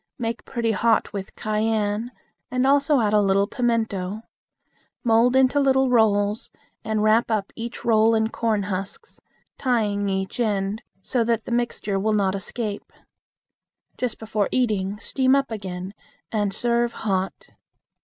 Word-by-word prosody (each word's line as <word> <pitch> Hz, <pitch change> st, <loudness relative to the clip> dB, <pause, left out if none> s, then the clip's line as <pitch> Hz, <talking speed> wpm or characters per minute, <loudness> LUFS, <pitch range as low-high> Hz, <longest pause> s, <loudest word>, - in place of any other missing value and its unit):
Make 230 Hz, -3 st, -4 dB
pretty 235 Hz, -3 st, -1 dB
hot 225 Hz, +2 st, +1 dB
with 195 Hz, -2 st, -6 dB
cayenne, 215 Hz, +1 st, -1 dB, 0.4 s
and 255 Hz, +1 st, 0 dB
also 280 Hz, +1 st, +4 dB
add 210 Hz, -1 st, +1 dB
a 210 Hz, -, +5 dB
little 195 Hz, 0 st, +3 dB
pimento. 220 Hz, -4 st, -1 dB, 0.8 s
Mold 235 Hz, +2 st, +4 dB
into 265 Hz, +2 st, +4 dB
little 265 Hz, -2 st, +3 dB
rolls, 210 Hz, -2 st, +2 dB, 0.3 s
and 220 Hz, -1 st, -1 dB
wrap 220 Hz, +2 st, +3 dB, 0.2 s
each 235 Hz, 0 st, -6 dB
roll 225 Hz, 0 st, +4 dB
up -, -, +4 dB
in 220 Hz, 0 st, +1 dB
corn 225 Hz, -3 st, 0 dB
husks, 200 Hz, -, -6 dB, 0.4 s
tying 210 Hz, -6 st, 0 dB
each 190 Hz, +3 st, -3 dB
end, 205 Hz, -1 st, 0 dB, 0.2 s
so 245 Hz, -3 st, 0 dB
that 230 Hz, -1 st, 0 dB
the -, -, -6 dB
mixture 235 Hz, -4 st, -1 dB
will 215 Hz, +2 st, +1 dB
not 195 Hz, -2 st, +2 dB
escape. 205 Hz, +1 st, -5 dB, 1.0 s
Just 250 Hz, -3 st, -3 dB
before 215 Hz, -2 st, -1 dB
eating, 210 Hz, -5 st, 0 dB
steam 260 Hz, +4 st, +2 dB
up 275 Hz, -3 st, 0 dB
again, 190 Hz, -3 st, -5 dB, 0.4 s
and 205 Hz, -3 st, 0 dB
serve 235 Hz, +2 st, 0 dB
hot. 195 Hz, -3 st, -3 dB
220 Hz, 140 wpm, -23 LUFS, 205-240 Hz, 1.0 s, a